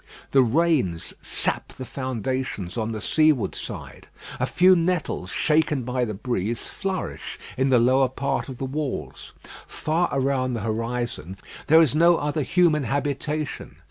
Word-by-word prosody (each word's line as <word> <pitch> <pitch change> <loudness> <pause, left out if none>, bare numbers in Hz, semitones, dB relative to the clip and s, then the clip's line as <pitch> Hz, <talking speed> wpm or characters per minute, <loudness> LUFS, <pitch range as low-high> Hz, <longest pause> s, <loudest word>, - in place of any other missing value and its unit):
The 135 - +6
rains 130 - +1
sap - - -1
the 130 - -7
foundations 130 -7 -3
on 115 -1 -2
the 110 -1 -5
seaward 155 -7 +2
side. - - -8 0.3
A - - +1
few 185 +1 +5
nettles, 165 - -1
shaken 150 - +1
by 125 +1 -1
the 110 -3 -4
breeze, 115 0 -2
flourish 190 -2 -4 0.2
in 135 +1 +1
the 130 - +5
lower 130 +2 +4
part 135 +2 -2
of 130 - -7
the 135 - -3
walls. 140 +1 -5 0.3
Far 165 +3 0
around 130 -2 0
the 115 - -3
horizon 115 -4 -3 0.3
there 160 +2 +7
is 150 - +1
no 170 +2 +5
other 150 +1 -1
human 160 +1 +3
habitation. 145 +2 -3
135 Hz, 145 wpm, -24 LUFS, 120-155 Hz, 0.3 s, there